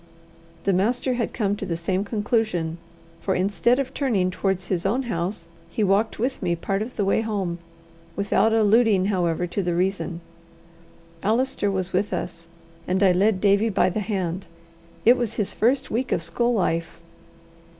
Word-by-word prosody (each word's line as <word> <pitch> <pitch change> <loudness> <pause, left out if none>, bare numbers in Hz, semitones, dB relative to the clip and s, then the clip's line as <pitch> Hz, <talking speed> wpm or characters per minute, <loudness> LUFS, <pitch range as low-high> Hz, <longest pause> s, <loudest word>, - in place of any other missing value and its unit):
The 195 - +2
master 240 +7 +1
had 240 -2 -1
come 205 -4 0
to - - -6
the 170 -4 -2
same 185 +3 -1
conclusion, 205 -6 -1 0.4
for 190 - -1
instead 205 +6 +2
of 270 -1 -2
turning 210 -11 +1
towards 190 0 -1
his 180 -2 -1
own 235 +8 +1
house, 175 -5 -3 0.2
he 215 - -1
walked 200 +3 +2
with 255 +4 -2
me 175 -3 0
part 195 +4 -2
of 235 +4 -5
the 205 - 0
way 195 - +2
home, 195 -6 -2 0.6
without 200 +2 +2
alluding 220 -2 +4
however 175 -2 0
to 180 +3 -2
the 175 -2 -1
reason. 180 -1 -1 1.0
Allister 225 0 +1
was 190 -1 -2
with 195 +2 0
us, 170 -1 -4 0.4
and 190 +2 +1
I 190 - +6
led 190 +2 +2
Davie 200 +3 +3
by 185 -3 +2
the 215 - -2
hand: 190 -3 -3 0.6
it 245 +3 +7
was 235 -2 -2
his 210 -4 -1
first 260 +4 +1
week 250 +4 -1
of 165 - 0
school 235 +9 0
life. 170 -4 -1
200 Hz, 170 wpm, -24 LUFS, 180-225 Hz, 1.0 s, it